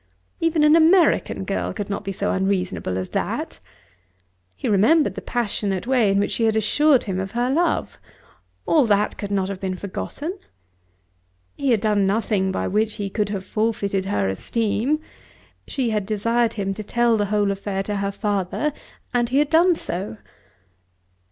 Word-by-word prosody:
Even 330 -2 +2
an 300 +1 +6
American 335 +2 +4
girl - - -2
could 205 -2 -4
not 200 0 -4
be 195 - -3
so 190 - -2
unreasonable 190 - -1
as 95 0 -4
that. - - -3 1.0
He - - -4
remembered 255 +11 +4
the - - -6
passionate 205 -5 -2
way 245 -5 +3
in 195 - +2
which 200 - +1
she 230 - 0
had 220 -1 +2
assured 270 +6 +3
him 190 -3 -3
of 195 +1 -3
her 245 +2 0
love. 340 +5 0 0.7
All 300 -5 +4
that 210 0 +2
could 205 - -4
not 195 -2 0
have 195 -1 -5
been 190 -1 -3
forgotten! 290 - -5 1.2
He 280 - -1
had 225 -5 +3
done 210 -3 +2
nothing 200 -2 +1
by - - -2
which 215 +2 0
he 200 -2 -4
could 210 -1 -1
have 195 -2 -4
forfeited 200 -3 -1
her 145 - 0
esteem. 225 - -1 0.7
She 255 -5 -1
had 210 -3 -1
desired 230 +2 +1
him 195 -2 -2
to 215 - -6
tell 235 +2 +2
the 205 -1 +1
whole 205 0 +1
affair 195 0 -3
to 205 +1 -3
her 200 0 -1
father, 205 +8 -1 0.4
and 240 -1 +1
he 260 - +1
had 295 0 +2
done 340 +2 +5
so. 195 - -5
210 Hz, 170 wpm, -22 LUFS, 195-245 Hz, 1.2 s, an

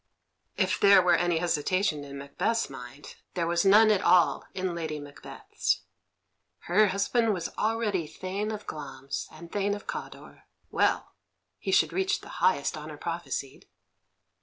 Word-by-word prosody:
If - - +1
there 200 -1 +7
were 180 -1 +4
any 175 -1 +2
hesitation 170 0 0
in 140 0 -8
Macbeth's 140 +9 -1
mind, 130 +2 -10 0.2
there 170 -2 0
was 170 0 +1
none 215 +3 +7
at 205 - +2
all 180 -2 +4
in 185 -2 -2
Lady 160 -3 -4
Macbeth's. 145 0 -3 0.8
Her 210 +5 +4
husband 205 +3 +1
was 170 -2 -5
already 215 -6 0
Thane 190 +7 -4
of 210 -1 -6
Glamis 140 -2 -6
and 170 +2 -12
Thane 205 0 0
of 205 - -10
Cawdor; - - -8 0.3
well, - - +1 0.5
he - - -5
should - - +3
reach 385 0 0
the - - -12
highest 465 - +2
honour - - -8
prophesied. - - -5
180 Hz, 145 wpm, -28 LUFS, 155-205 Hz, 0.8 s, there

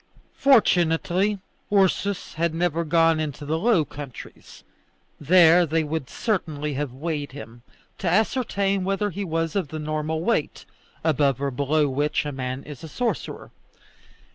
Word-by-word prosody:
Fortunately 190 -5 +3 0.3
Ursus 200 -1 +1
had 165 0 -1
never 170 -1 0
gone 165 0 +3
into 150 -1 -4
the 160 +2 -1
Low 200 -6 +3
Countries; 140 -2 -11 0.6
there 170 +2 +6
they 165 0 0
would 150 -3 -4
certainly 155 -9 -2
have 140 -1 -3
weighed 145 +1 -4
him, 120 -2 -10 0.4
to 185 - 0
ascertain 200 -1 +1
whether 195 +2 -1
he 200 +4 -4
was 165 -1 -2
of 190 -6 0
the 155 - -6
normal 155 +1 -2
weight, 225 -8 -1 0.4
above 145 -4 +2
or 140 0 -1
below 145 +3 +1
which 145 +3 0
a 145 - -3
man 130 0 -4
is 150 +1 -10
a - - -6
sorcerer. 225 - -3
160 Hz, 140 wpm, -24 LUFS, 145-185 Hz, 0.6 s, there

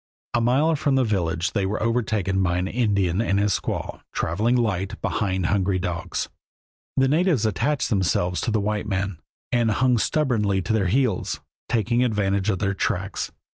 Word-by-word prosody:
A 120 - +2
mile 140 +7 +3
from 140 -2 +1
the 130 - +3
village 90 -5 0
they 100 -1 0
were 100 +3 -1
overtaken 110 -5 0
by 90 -1 +1
an 90 +1 -1
Indian 100 -5 +1
and 100 -4 +1
his 100 -1 +2
squaw, - - -4
traveling 105 +9 0
light 100 -6 -1
behind 95 -4 -1
hungry 95 0 +1
dogs. 90 -2 -3 0.7
The 135 0 +4
natives 155 - +2
attached 130 +7 0
themselves 90 -3 +1
to - - -1
the 110 -1 +1
white 105 +1 -1
men 95 -3 -2 0.3
and 120 -2 +2
hung 125 +3 +2
stubbornly 110 -10 +1
to 100 - -1
their 105 -4 +2
heels, 120 -1 0 0.3
taking 120 +2 +2
advantage 100 -4 +1
of 95 - +1
their 100 0 0
tracks. 95 0 -2
105 Hz, 170 wpm, -24 LUFS, 95-120 Hz, 0.7 s, The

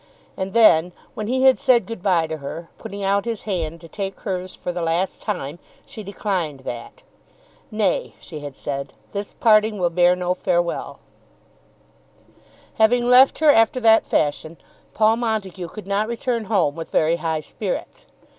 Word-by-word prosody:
And 190 0 -4
then 180 -6 +5 0.2
when 215 -5 -5
he 260 +2 0
had 265 -1 +5
said 245 -6 +3
good 225 -3 -7
bye 180 -4 +2
to 160 0 -5
her, 160 +4 -7
putting 200 0 -7
out 200 +2 +1
his 230 -3 -4
hand 170 -5 -3
to 165 - -11
take 195 +2 -5
hers 185 -2 -4
for 180 - -4
the 175 0 -4
last 170 +3 -1
time, 175 -7 -4 0.3
she 220 - -9
declined 185 -8 -3
that. 130 - -8 0.7
"Nay," 215 -4 -1
she 155 - -9
had 145 -2 -8
said; 140 -1 -5 0.2
"this 200 0 -5
parting 215 -1 +3
will 175 -2 0
bear 175 +1 +4
no 180 0 -1
farewell." 175 -1 -2 1.8
Having 240 +2 +4
left 260 +2 +7
her 310 -1 +6
after 225 0 +3
that 225 -2 +4
fashion 155 +2 -1 0.4
Paul 220 +1 +4
Montague 210 -6 -3
could 210 +4 -10
not 200 +2 0
return 235 -1 -2
home 190 -8 +1
with 165 -1 -7
very 160 +2 +2
high 160 -1 -2
spirits. - - -6
195 Hz, 165 wpm, -22 LUFS, 165-220 Hz, 1.8 s, left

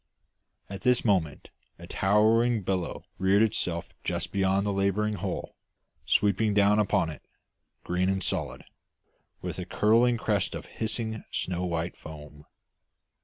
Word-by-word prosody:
At 100 -1 -8
this 125 -1 +2
moment 90 -9 0 0.3
a - - -10
towering 110 +3 +2
billow 90 -1 -2
reared 100 +2 +4
itself 90 -6 -1
just - - -3
beyond 95 0 +1
the 100 - 0
labouring 100 +2 +1
hull, 95 -1 -4 0.5
sweeping 105 +1 +2
down 105 +1 +4
upon 100 -5 +1
it, 75 - -11 0.6
green 90 +1 0
and 95 0 -1
solid, - - -2 0.8
with - - -4
a 90 - -4
curling 115 +5 +3
crest 105 -4 -1
of - - -6
hissing, 110 0 -3
snow 90 0 -2
white 85 0 -2
foam. 75 -1 -12
100 Hz, 130 wpm, -28 LUFS, 90-110 Hz, 0.8 s, reared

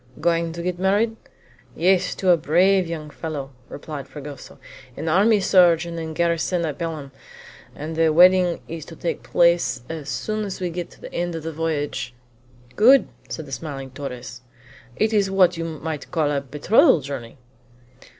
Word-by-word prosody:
"Going 165 +1 +1
to 170 0 -6
get 180 0 -3
married?" 205 +4 +2 0.6
"Yes, 185 +1 +2
to 185 -2 +2
a - - +7
brave 180 +4 +3
young 155 -3 -6
fellow," 150 -4 -6 0.2
replied 145 -1 -7
Fragoso 145 -1 -10 0.4
"an 155 - -5
army 205 +6 +4
surgeon 170 -3 +3
in 160 -1 -5
garrison 170 +1 0
at 150 -3 -4
Belem, 155 -5 -5 0.6
and 155 +2 -6
the 165 0 +3
wedding 180 +1 +5
is 165 -1 -6
to 165 - -11
take 170 - -3
place 170 -7 +2
as 155 -3 -6
soon 215 0 -2
as 195 -2 -5
we 180 -2 -2
get 175 0 -5
to - - -19
the - - -10
end 175 0 -2
of 165 - -6
the 165 0 -5
voyage." 145 -6 -3 0.6
"Good!" 255 +6 +6 0.2
said 160 - -5
the 135 - -12
smiling 135 -1 -6
Torres; 125 -3 -7 0.5
"it 215 - +1
is 200 -2 +2
what 185 -2 +4
you 165 0 -4
might 160 -1 -5
call 155 -4 0
a 140 -1 0
betrothal 150 - +3
journey." 130 -3 -7
165 Hz, 170 wpm, -22 LUFS, 150-180 Hz, 0.6 s, a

